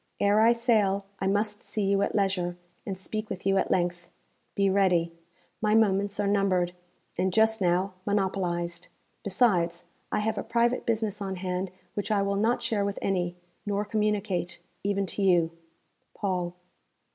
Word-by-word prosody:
Ere 205 +1 +4
I 230 +1 +6
sail, 215 -5 +2
I 190 - 0
must 205 +1 0
see 215 - -3
you 195 0 +2
at - - 0
leisure, 185 -3 0 0.3
and 195 -2 -3
speak 215 +3 -4
with 185 - -6
you 195 0 +3
at - - -1
length. 175 -1 0 0.5
Be 200 0 +3
ready. 180 -4 +2 0.5
My 215 0 +3
moments 200 -2 +2
are 205 - +1
numbered, 195 -3 +2 0.5
and, 190 0 +2
just 220 +2 +3
now, 185 +2 +2
monopolized; 180 -4 -1 0.4
besides, 185 -5 +2 0.3
I - - +1
have 220 +1 -1
a - - -3
private 235 +1 +1
business 215 -3 0
on 190 -1 -3
hand 185 0 -3 0.2
which 205 - -3
I 205 -2 +2
will 200 0 0
not 230 +4 +1
share 220 -3 0
with 200 0 -2
any, 175 -2 -1 0.3
nor 205 0 -1
communicate, 210 -4 -1 0.3
even 200 0 0
to 195 - -4
you. 175 -4 +4 0.6
Paul.' 180 -3 -2
195 Hz, 160 wpm, -28 LUFS, 180-210 Hz, 0.6 s, I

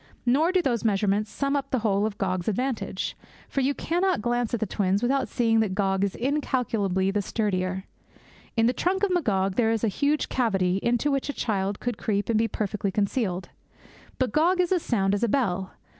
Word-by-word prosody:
Nor 290 +8 +3
do 370 -1 +2
these 240 -5 0
measurements 205 0 +1
sum 275 0 -1
up 275 -1 -2
the 260 - +1
whole 205 0 +2
of 205 - -7
Gog's 185 -2 -2
advantage. 225 -3 -2 0.3
For 275 - -1
you 275 +2 +1
cannot 360 +1 0
glance 240 -1 0
at 235 - -1
the 220 - 0
twins 200 +1 0
without 270 +2 +1
seeing 225 -2 +2
that 210 -4 0
Gog 195 -1 +1
is 200 -1 -1
incalculably 230 -8 0
the 205 +1 0
sturdier. 190 -3 -1 0.7
In 225 - +4
the 245 - +3
trunk 380 +7 0
of 400 - +2
Magog 195 - +1
there 225 -2 +3
is 225 -1 0
a - - +3
huge 290 +8 0
cavity 195 -7 +1
into 240 +4 +1
which 275 +1 -1
a - - -1
child 200 -4 -1
could 245 -3 -3
creep 205 0 -1
and 220 -2 +3
be 225 - +2
perfectly 210 -2 -2
concealed; 195 -3 -1 0.7
but 255 -4 0
Gog 345 - +3
is 360 0 +2
as 365 -2 +2
sound 195 -7 +1
as 205 - 0
a 235 - +2
bell. 190 -8 0
225 Hz, 205 wpm, -26 LUFS, 195-270 Hz, 0.7 s, In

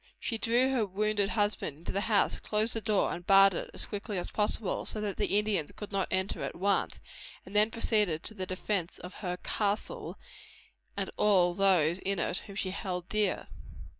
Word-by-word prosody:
She 225 -2 -2
drew 245 +4 +3
her 250 -4 +2
wounded 205 0 0
husband 205 -9 -1
into 165 - -6
the 200 - -1
house, 205 0 +2
closed 215 +2 -1
the 225 - -3
door 210 -1 +1
and 175 - -6
barred 195 +1 +7
it - - -4
as - - -6
quickly 205 -1 -4
as 175 - -4
possible, 210 -1 -1
so 215 - -2
that 210 -2 -3
the 200 - +2
Indians 210 -7 0
could 210 - -9
not 195 -2 0
enter 190 +1 -1
at - - -4
once, 200 +3 0 0.4
and 190 - -11
then 210 +1 +5
proceeded 210 -8 +1
to - - -6
the 190 -3 -5
defence 185 -1 -2
of 180 - -9
"her 180 -3 -2
castle," 205 0 -1 0.8
and - - -2
all 185 -4 +4
those 180 -3 +3
in 195 +1 -1
it 175 +1 0
whom 200 - -9
she 190 -1 -2
held 180 -2 -4
dear. 210 -3 0
200 Hz, 195 wpm, -30 LUFS, 185-215 Hz, 0.8 s, barred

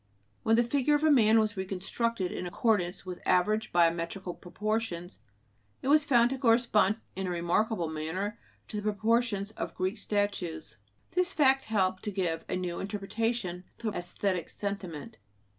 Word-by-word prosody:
When 225 - +3
the 240 - +4
figure 280 +4 +2
of 295 - 0
a 315 - +5
man 225 -5 +6
was 215 -1 +1
reconstructed 190 +2 -2
in 180 - -4
accordance 190 -2 0
with 180 -1 -6
average 215 +4 +2
biometrical 170 +2 +1
proportions, 200 -2 -3 0.6
it 265 - -1
was 300 0 +5
found 240 -3 +4
to 270 - -3
correspond 230 -4 +4 0.2
in 190 0 -3
a - - -2
remarkable 175 +2 0
manner 160 +7 -3 0.3
to 215 - -4
the - - -2
proportions 215 0 +1
of - - -5
Greek 185 +4 -2
statues. 180 - -2 0.3
This 360 +1 +1
fact 270 -2 +4
helped 190 -4 +1
to 210 - -1
give 175 -4 -2
a - - 0
new 180 -1 -3
interpretation 200 -2 -2
to 220 -2 -2
"æsthetic 175 -1 -2
sentiment." 190 -8 -5
205 Hz, 155 wpm, -30 LUFS, 180-230 Hz, 0.6 s, man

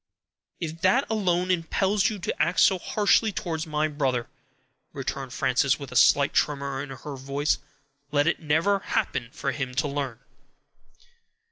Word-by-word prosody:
"If 165 -1 -5
that 240 +9 +3
alone 185 -4 +1
impels 190 +3 +1
you 215 - -5
to 175 - -3
act 170 +3 +2
so 190 - +5
harshly 210 +3 +2
towards 160 -4 -3
my 155 0 0
brother," 135 -5 -1 0.7
returned - - -4
Frances, - - +2
with - - -9
a - - -8
slight - - +5
tremor 140 -2 0
in 145 - -7
her 135 +2 -7
voice, 140 +3 -1 0.5
"let 145 -1 +3
it 170 - +1
never 165 +6 +2
happen 120 -9 -2
for 135 - -2
him 130 -2 -4
to 140 +4 +1
learn." 140 -5 -3
155 Hz, 150 wpm, -26 LUFS, 140-185 Hz, 0.7 s, so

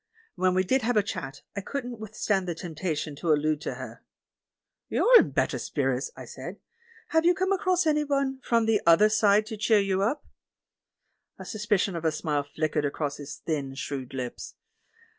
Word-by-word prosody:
When 185 -3 +1
we 185 - +3
did 260 +8 +2
have 235 0 +1
a 210 - +4
chat, 140 -8 -6
I 200 - -2
couldn't 245 0 -5
withstand 210 -3 -1
the 170 - -2
temptation 160 -3 -4
to 170 - -3
al 155 - +5
lude 155 0 0
to - - -4
her. - - -9 0.9
"You're - - +6
in - - +2
better - - 0
spirits," - - -1
I - - -8
said; - - -8 0.5
"have 320 0 +3
you 350 +1 +4
come 375 +2 0
across 370 -2 +2
anybody 280 -3 +1
from 230 -3 +2
the 220 -2 +2
'other 170 +6 +7
side' 210 -1 +4
to 220 0 -6
cheer 220 +1 +3
you 195 -1 +1
up?" 240 +9 0 1.1
A - - -9
suspicion 210 -3 0
of 165 - -4
a 160 - +2
smile 150 -1 -1
flickered 155 -1 0
across 145 0 -2
his 145 0 -9
thin, 140 -4 -2
shrewd 135 -2 -5
lips. 125 -2 -6
195 Hz, 180 wpm, -27 LUFS, 155-240 Hz, 1.1 s, other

